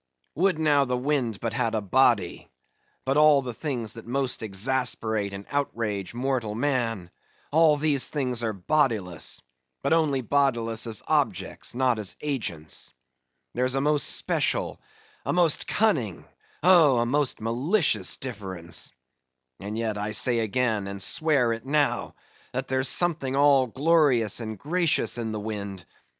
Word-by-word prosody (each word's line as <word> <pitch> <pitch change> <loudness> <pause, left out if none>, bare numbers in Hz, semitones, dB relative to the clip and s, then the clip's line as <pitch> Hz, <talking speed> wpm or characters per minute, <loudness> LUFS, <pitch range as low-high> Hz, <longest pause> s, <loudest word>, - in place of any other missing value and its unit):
Would 180 +2 +1
now 150 -3 +3
the 125 -1 -1
wind 125 -5 -1
but 115 -2 -3
had 115 +1 0
a - - +1
body; 105 -3 +1 0.6
but 135 +2 +1
all 150 -2 +5
the 125 -2 -5
things 120 -5 -4
that 115 0 -11
most 135 +1 -2
exasperate 110 -1 -1
and 100 0 -8
outrage 115 -8 -2
mortal 125 -4 -2
man, 115 -8 -1 0.4
all 155 0 +4
these 145 -3 +3
things 125 -5 -1
are 115 -2 -1
bodiless, 100 - -1 0.4
but - - +2
only 150 -5 +2
bodiless 120 -4 0
as 110 -3 -1
objects, - - -1
not 125 -3 +1
as 100 -4 -2
agents. 105 - -3 0.6
There's 130 +2 0
a 135 - +1
most 150 0 +1
special, - - -1 0.4
a - - -1
most 170 -3 +2
cunning, 145 - 0 0.4
oh, 165 -8 +6
a 120 - +2
most 140 +2 0
malicious 120 - +1
difference! 95 -9 -3 0.7
And 105 +3 -5
yet, 110 -2 -2
I 105 +1 -3
say 120 +2 +3
again, 110 -2 0
and 100 0 -6
swear 125 - +2
it 115 - -7
now, 145 +2 0 0.4
that 130 +1 -3
there's 130 0 +1
something 160 -7 0
all 140 -2 +4
glorious 135 -5 +2
and 110 -2 -5
gracious 165 - +1
in 115 -1 -3
the 110 - -4
wind. 100 -3 -6
125 Hz, 145 wpm, -26 LUFS, 110-145 Hz, 0.7 s, oh